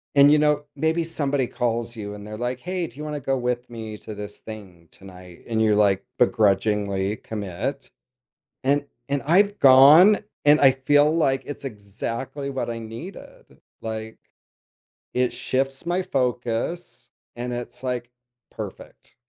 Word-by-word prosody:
and, 140 0 +8
you 150 - +6
know, 150 -1 +2
maybe 160 +3 +1
somebody 145 -5 -1
calls 120 -1 -2
you 105 -2 -6
and 105 0 -9
they're 110 0 -7
like, 125 +2 -3
"Hey, 180 +3 -3
do 125 - -11
you 150 - -6
wanna 150 -1 -4
go 135 0 -1
with 125 0 -2
me 110 -2 -7
to 110 - -8
this 105 0 -8
thing 95 -7 -11
tonight?" 90 -2 -14
and 115 -2 -1
you're, 110 -1 +4
like, 100 -1 +2
begrudgingly 100 -3 +2
commit, 110 +7 -5 0.7
and 145 +2 +1 0.2
and 140 0 -1
I've 200 +7 +3
gone, 145 +10 +8 0.3
and 150 +1 +6
I 135 -2 +7
feel, 145 +3 +3
like, 135 -5 +1
it's 145 - -7
exactly 115 +5 -5
what 135 -2 -3
I 115 - -4
needed, 115 - -11 0.2
like, 110 0 -6 1.0
it 125 0 +1
shifts 135 +3 -2
my 175 +2 0
focus, 125 -1 -2 0.3
and 125 0 -4
it's, 120 +2 -6
like, 125 -2 -3 0.4
perfect. - - -10
125 Hz, 150 wpm, -24 LUFS, 110-145 Hz, 1.0 s, and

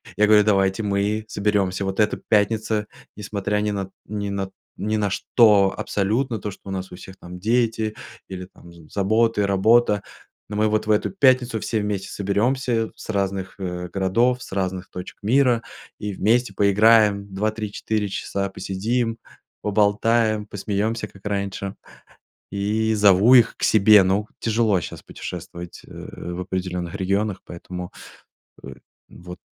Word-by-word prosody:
я 105 - +3
говорю: 105 -1 +6
"Давайте 95 -1 +2
мы 105 +2 0
соберемся! 100 -3 0
Вот 95 +2 -3
это 105 - +2
пятница, 110 0 +1 0.3
несмотря 105 0 -2
ни 105 0 0
на 100 -2 -3 0.2
ни 100 -1 -4
на 100 -1 -3 0.3
ни 110 +1 -1
на 105 -1 0
что 100 -1 +4
абсолютно, 110 +4 -1
то 105 +2 -4
что - - -14
у - - -4
нас 95 0 -4
у - - -8
всех 95 +1 -12
там 90 +1 -10
дети, 110 +1 0 0.3
или 90 -1 -6
там 85 -1 -17
з 85 -2 -16
заботы, 110 +1 +2
работа, 105 +2 +3 0.5
ну 105 - -5
мы 105 +1 +2
вот 110 0 0
в - - +3
эту 105 - +1
пятницу 130 - +3
все 110 +1 -1
вместе 100 -2 -3
соберемся 115 +3 0
с - - -12
разных, 95 -2 -2
э, 90 -1 -4
городов, 115 +7 +1
с - - -10
разных 95 -1 -3
точек 90 +1 -8
мира, 120 +1 +3 0.4
и 105 -1 -4
вместе 110 +3 +1
поиграем 100 0 +4
2-3-4 105 0 -2
часа, 100 0 -3
посидим, 115 +5 -2 0.4
поболтаем, 105 +1 +2
посмеемся 105 +3 -2
как 100 - -19
раньше". 100 -1 -3 0.8
И 105 +3 0
зову 105 +3 +6
их 120 -3 +5
к - - -14
себе. 105 -1 +6
Ну, 95 +3 +1
тяжело 110 -4 +2
щас - - -8
путешествовать, 85 0 -8
э, - - -18 0.4
в 90 - -4
определенных 90 -2 -4
регионах, 100 +1 -1
поэтому, 90 +1 -8 0.7
э, 65 - -8 0.4
вот. 90 0 -11
105 Hz, 150 wpm, -23 LUFS, 95-110 Hz, 0.8 s, говорю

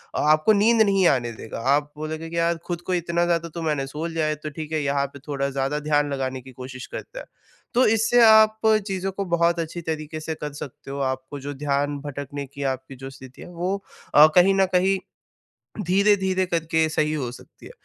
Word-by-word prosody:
अ - - 0
आपको 155 +7 +4
नींद 220 +2 +4
नहीं 195 -3 +4
आने 120 -5 +1
देगा। 110 0 -8 0.2
आप 145 0 -2
बोलोगे 155 +1 -5
कि 170 - -5
यार 170 0 +1
खुद 175 -1 -4
को 185 - 0
इतना 170 0 0
ज़्यादा 170 -1 0
तो 170 - -4
मैंने 150 -4 -1
सो 150 +4 -5
लिया 165 -2 -1
है, 155 0 0
तो 150 +1 -7
ठीक 155 +1 -7
है 155 - +1
यहाँ 140 0 +1
पे 140 - -10
थोड़ा 140 -1 -1
ज़्यादा 135 +2 -1
ध्यान 145 -1 +1
लगाने 130 -1 -3
की 130 +1 -13
कोशिश 130 0 -8
करता - - -8
है। - - -9 0.5
तो 255 - +5
इससे 225 +2 +3
आप 220 0 +6 0.3
चीज़ों 195 -1 -2
को 195 +1 -4
बहुत 170 0 +2
अच्छी 165 +1 -4
तरीके 155 -1 -4
से 160 0 -4
कर 150 -1 -6
सकते 135 0 -10
हो। 140 - -5
आपको 130 +2 -9
जो 145 +1 -5
ध्यान 145 0 -1
भटकने 145 0 -6
की 140 +1 -7
आपकी 130 +1 -14
जो 135 +1 -8
स्थिति 130 -1 -13
है - - -11
वो 180 +3 -2 0.4
अ, 150 +1 +10
कहीं 185 +2 +6
न 195 0 +4
कहीं 190 +2 +3 0.9
धीरे-धीरे 190 0 +2
करके 160 -2 +1
सही 155 0 0
हो 130 -6 -3
सकती 125 - -15
है। - - -12
155 Hz, 215 wpm, -24 LUFS, 140-180 Hz, 0.9 s, अ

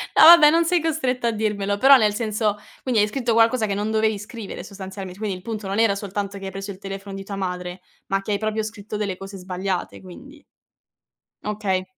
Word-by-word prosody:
ah, - - +6
no - - +11
vabbè, 320 -3 +9
non 335 +1 +3
sei 350 -1 +2
costretta 260 -7 -1
a 230 - +2
dirmelo, 210 -2 -1
però 270 +5 +8
nel 210 -3 +2
senso 215 -1 -1 0.2
quindi 245 -5 +2
hai 210 - +3
scritto 240 +1 -1
qualcosa 225 0 +4
che 200 - -2
non 210 +2 -2
dovevi 220 -1 +1
scrivere 210 -3 -8
sostanzialment 190 -1 -8
quindi 205 -2 -3
il 180 - -10
punto 215 -2 -5
non 195 +1 -2
era 220 -3 +4
soltanto 200 0 -4
che 195 - -8
hai 190 - -5
preso 195 +1 -6
il 190 - -11
telefono 195 0 -7
di 195 - -6
tua 200 0 -6
madre, 180 -1 -4 0.3
ma 195 0 0
che 205 - -5
hai 205 - +2
proprio 215 0 -1
scritto 215 -1 -6
delle 200 -3 -2
cose 195 0 -9
sbagliate, 185 0 -4
quindi? 275 - -13 1.0
Okay. 205 -3 -1
205 Hz, 220 wpm, -23 LUFS, 195-225 Hz, 1.0 s, no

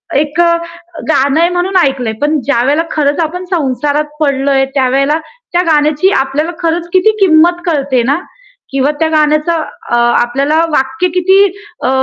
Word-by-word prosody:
एक 295 +3 -1
अ, 340 0 +3 0.5
गाणं 280 +1 +2
आहे 340 +1 +3
म्हणून 370 +2 -1
ऐकलंय. 265 -8 0
पण 300 +1 +1
ज्यावेळेला 285 +4 +1
खरंच 290 0 0
आपण 360 +4 -4
संसारात 295 -2 -1
पडलोय, 275 -2 +1
त्यावेळेला 275 +3 +1 0.4
त्या 350 - +3
गाण्याची 305 +3 +2
आपल्याला 285 +5 -2
खरंच 335 +1 -1
किती 375 +4 +4
किंमत 345 -1 +4
कळते 280 -6 0
ना? 280 +4 +1 0.6
किंवा 275 +2 +1
त्या 320 0 +1
गाण्याचं 305 +1 +1 0.3
अ, - - +2 0.3
आपल्याला 275 +6 0
वाक्य 300 +5 0
किती 380 +2 +3 0.5
अ, - - +1
300 Hz, 145 wpm, -12 LUFS, 275-335 Hz, 0.6 s, किती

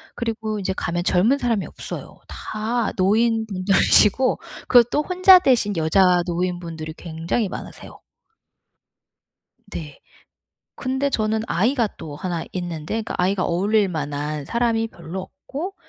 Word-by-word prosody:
그리고 220 -2 -3
이제 190 -1 -2
가면 175 0 -2
젊은 205 +10 +3
사람이 235 -7 -1
없어요. - - -8
다 225 +2 -3
노인분들이시고 215 +2 +3 0.3
그리고 245 -1 +6
또 295 - +1
혼자 370 +2 +7
되신 235 - +2
여자 180 +2 +3
노인분들이 170 -3 -3
굉장히 165 +6 -2
많으세요. - - -9 1.7
네. 150 -4 -8 0.8
근데 265 +2 -1
저는 220 -3 0
아이가 230 +6 +1
또 150 -2 -8
1 170 +1 -3
있는데 175 +3 -4
그 225 - -6
아이가 185 +1 +1
어울릴 200 +4 +1
만한 145 -2 -4
사람이 230 +2 0
별로 170 0 -7
없고 300 - -7
200 Hz, 275 characters per minute, -22 LUFS, 175-230 Hz, 1.7 s, 혼자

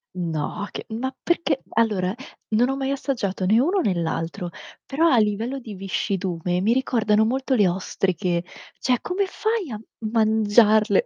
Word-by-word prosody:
No, 170 +4 -3
che - - -6
ma 255 +4 -3
perché 335 -5 0
allora 210 -5 +1 0.4
non 245 +4 +3
ho 270 - 0
mai 270 0 -2
assaggiato 235 -9 -2
né 215 +5 +4
uno 360 +9 +2
né 205 - +2
l'altro, 170 +2 -3 0.3
però 320 +5 +1
a 255 -7 +5
livello 220 +5 0
di 220 -4 -9
viscidume 185 -2 -2
mi 220 +5 +3
ricordano 220 -4 +2
molto 265 +3 0
le 205 -6 +4
ostriche. 180 -1 -1 0.4
Cioè 250 -2 +1
come 390 +2 -1
fai 435 - -1
a 215 -2 -5 0.3
mangiarle? 215 -1 +4
220 Hz, 150 wpm, -23 LUFS, 190-265 Hz, 0.4 s, a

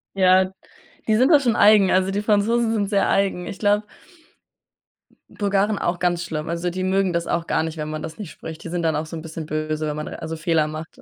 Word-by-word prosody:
Ja, 185 0 +4 0.6
die 215 - +3
sind 255 +6 +4
da 295 - +7
schon 240 -5 +1
eigen. 205 -3 +6
Also 185 +1 +2
die 205 +1 -1
Franzosen 225 +2 +2
sind 205 -2 -1
sehr 200 -2 +2
eigen. 190 -3 0
Ich - - -7
glaube 205 0 +2 1.5
Bulgaren 200 0 0
auch 175 0 -1
ganz 175 -1 0
schlimm. 155 0 -5
Also, 170 +1 -2
die 185 +1 -3
mögen 190 -1 +1
das 170 0 -1
auch 170 -1 -1
gar - - 0
nicht, 160 0 -5
wenn 150 0 -4
man 155 0 -5
das 160 0 -7
nicht 205 -7 -7
spricht. 160 0 -9
Die 165 - -6
sind 175 0 -2
dann 160 -2 +1
auch 155 +1 -2
so 165 - -8
'n 160 - -6
bisschen 160 -1 -7
böse, 155 0 -2
wenn 150 - -3
man 150 - -5
also 160 0 -6
Fehler 160 -1 +1
macht. 155 +1 -8
180 Hz, 235 wpm, -22 LUFS, 160-200 Hz, 1.5 s, da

